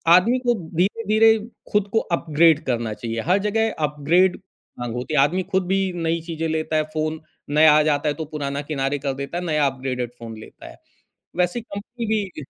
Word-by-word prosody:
आदमी 230 +8 +4
को 245 -1 +2 0.2
धीरे-धीरे 220 +4 +3 0.3
ख़ुद 210 -1 +2
को 220 - +4 0.2
अपग्रेड 160 -1 +4
करना 115 -4 -1
चाहिए, 115 0 -4
हर 180 - +2
जगह 225 +1 +1 0.2
अपग्रेड 165 +6 +2 0.4
हाँ, 120 - -3
होती 125 +6 -4
है। 150 - +3
आदमी 155 +7 +3
ख़ुद 190 -1 +1
भी 195 - +2 0.2
नई 165 0 -1
चीज़ें 165 -1 -4
लेता 160 0 -1
है। 155 - +3
फ़ोन 155 0 -2 0.3
नया 150 +1 +6
आ 155 - +5
जाता 150 0 +1
है - - 0
तो 160 +1 -5
पुराना 140 -1 -3
किनारे 145 -1 -2
कर 140 -1 -2
देता 140 +5 -5
है, 180 - -3
नया 150 -3 +2
अपग्रेडेड 130 -2 -3
फ़ोन 115 -1 -8
लेता 110 - -12
है, - - -13 0.6
वैसे 180 +6 +1
ही - - -11
कंपनी 230 +3 -6
भी 200 -9 -2
155 Hz, 195 wpm, -22 LUFS, 140-190 Hz, 0.6 s, नया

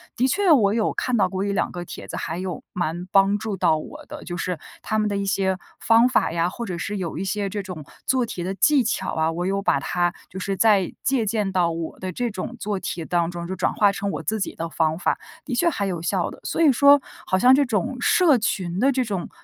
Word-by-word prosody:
的 255 - +2
确 380 +6 +2
我 210 -9 +5
有 220 -1 +1
看 250 - -1
到 200 -5 +3
过 190 +1 -2
1-2 200 -1 0
个 175 -1 -6
帖 - - -8
子 - - -5
还 165 0 -4
有 180 -2 -4
蛮 175 0 -2
帮 195 +1 +4
助 210 0 -4
到 170 -3 +3
我 155 - -9
的。 - - -9
就 175 - -5
是 180 -1 -3 0.2
他 215 - -1
们 215 - +1
的 205 - -1
一 200 - -2
些 190 -1 0 0.2
方 230 +2 +5
法 255 - +2
呀， 170 +1 +1
或 235 +5 -6
者 180 -5 -4
是 205 +4 -3
有 175 -4 -4
一 - - -2
些 200 +1 -2
这 205 +1 -4
种 180 -6 -8 0.2
做 255 -2 +2
题 185 -6 -5
的 185 +2 -2
技 280 +6 +4
巧 220 - -2
啊， 160 0 +1
我 175 +2 -3
有 195 +1 0
把 - - +2
它 175 -1 0 0.2
就 185 - -9
是 195 +1 -2
在 205 -4 +3
借 260 -4 +1
鉴 210 -2 0
到 180 -2 +2
我 165 -1 -5
的 185 0 -4
这 240 +6 -2
种 190 -3 -5
做 205 -1 -2
题 170 -3 -4
当 170 -1 +1
中， 170 -1 -6
就 190 - -4
转 - - 0
化 205 -1 +4
成 200 0 -3
我 - - -4
自 220 0 -1
己 195 - -2
的 165 0 -4
方 160 -1 0
法， - - +1 0.3
的 255 - -3
确 340 +7 +3
还 205 -11 -2
有 180 -4 -3
效 170 - 0
的。 - - -11
所 - - -2
以 310 -4 +6
说， 280 +2 +6 0.2
好 185 - +1
像 250 +5 +7
这 285 +1 +3
种 225 0 -1
社 320 -1 +5
群 185 -5 -2
的 270 +5 +4
这 260 -1 +1
种 195 -6 -3
195 Hz, 270 characters per minute, -23 LUFS, 175-225 Hz, 0.3 s, 像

